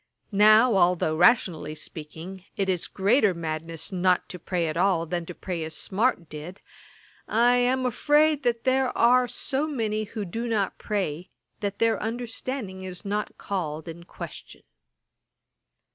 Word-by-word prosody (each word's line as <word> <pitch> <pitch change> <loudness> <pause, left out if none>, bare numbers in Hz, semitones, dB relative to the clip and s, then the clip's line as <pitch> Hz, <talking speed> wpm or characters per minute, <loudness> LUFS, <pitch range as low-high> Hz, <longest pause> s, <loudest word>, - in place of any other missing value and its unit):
Now 215 +3 +6
although, 175 -3 +3
rationally 175 -5 +3
speaking, 165 +5 -8
it 195 -1 0
is 180 -3 -1
greater 205 0 +2
madness 165 +1 -4
not 185 -1 +2
to 180 - -7
pray 170 0 -1
at 155 - -3
all, 175 -1 +2
than 170 0 -3
to 180 - -7
pray 175 -3 -4
as 160 0 -5
Smart 200 -4 0
did, 155 +6 -9 0.7
I 240 +2 +4
am 255 +1 +2
afraid 295 +4 +3
there 255 +1 +1
are 250 +1 +5
so 275 +5 -2
many 215 -7 -1
who 210 -1 -5
do 230 +7 -4
not 210 -4 -1
pray, 185 -5 -3 0.3
that 200 -1 -3
their 230 0 +2
understanding 225 -2 -4
is 185 +2 -7
not 210 +1 -3
called 160 -6 -4
in 165 +1 -8
question.' - - -10
195 Hz, 145 wpm, -26 LUFS, 170-235 Hz, 0.7 s, Now